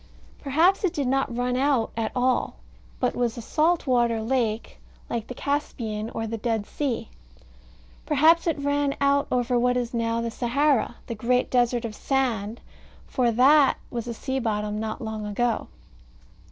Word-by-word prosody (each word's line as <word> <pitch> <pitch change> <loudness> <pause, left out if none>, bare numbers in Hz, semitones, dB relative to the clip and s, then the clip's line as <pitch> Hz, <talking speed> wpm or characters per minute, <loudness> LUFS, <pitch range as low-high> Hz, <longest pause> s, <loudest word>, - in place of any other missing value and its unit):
Perhaps 325 +9 +2
it 375 - +1
did 285 - 0
not 265 -2 0
run 250 0 0
out 265 -3 +1
at 225 -1 -2
all; 255 0 +1 0.4
but - - 0
was 240 -1 -1
a - - -4
salt 320 +7 +1
water 240 -3 +2
lake, 225 -1 -1 0.3
like 230 -2 -2
the 250 - -7
Caspian, 230 -7 -3
or 225 - -4
the 225 0 -4
Dead 225 -2 -1
Sea. 245 -5 -3 1.0
Perhaps 320 +4 +4
it 325 - +1
ran 285 0 0
out 280 0 +2
over 245 0 +1
what 250 +1 +2
is 245 -1 -2
now 230 0 0
the 230 0 -2
Sahara, 255 +1 +1
the - - -4
great 250 +3 0
desert 245 -1 +2
of 220 - -5
sand, 235 -4 -1 0.4
for, 250 -2 +1
that 270 +5 +5
was 235 -1 -4
a 235 - -3
sea 265 +3 -3
bottom 210 -3 -2
not 220 0 -4
long 220 -1 -4
ago. 230 +3 -1
245 Hz, 165 wpm, -25 LUFS, 230-275 Hz, 1.0 s, that